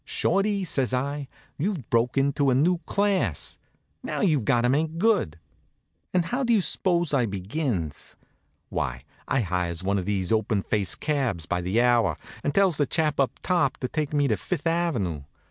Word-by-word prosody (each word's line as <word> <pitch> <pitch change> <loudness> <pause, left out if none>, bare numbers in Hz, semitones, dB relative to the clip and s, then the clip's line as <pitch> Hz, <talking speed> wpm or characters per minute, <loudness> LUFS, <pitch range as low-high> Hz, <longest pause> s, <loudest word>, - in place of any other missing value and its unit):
"Shorty," 195 +5 0
says 135 -6 0
I, 140 +2 -2 0.3
"you've 170 - -2
broke 120 +3 +2
into 140 0 +2
a 125 - +3
new 170 +6 +3
class. 195 - 0 0.4
Now - - -3
you've 150 - +2
got 120 -4 +3
to 120 - +2
make 155 +4 0
good." 190 - +2 0.7
And 180 -2 +2
how 250 +9 -1
do 240 -2 +3
you 220 - +5
s'pose 175 -4 0
I 125 -4 +3
begins? 100 - -2 0.5
Why, 60 +1 -3 0.2
I 135 - +1
hires 90 -3 -2
one 100 +1 +1
of 90 - -5
these 95 -2 -1
open 110 -2 +1
faced 100 -5 -1
cabs 130 - 0
by 90 +4 -1
the 95 +6 0
hour, 120 -9 +3 0.3
and 145 - +1
tells 195 -5 +4
the 145 - +1
chap 155 -1 0
up 135 - +1
top 170 -8 +1
to 125 - -3
take 150 +1 -2
me 145 -2 +2
up 110 -6 0
Fifth 150 - -3
ave. 150 - 0
135 Hz, 180 wpm, -26 LUFS, 100-165 Hz, 0.7 s, you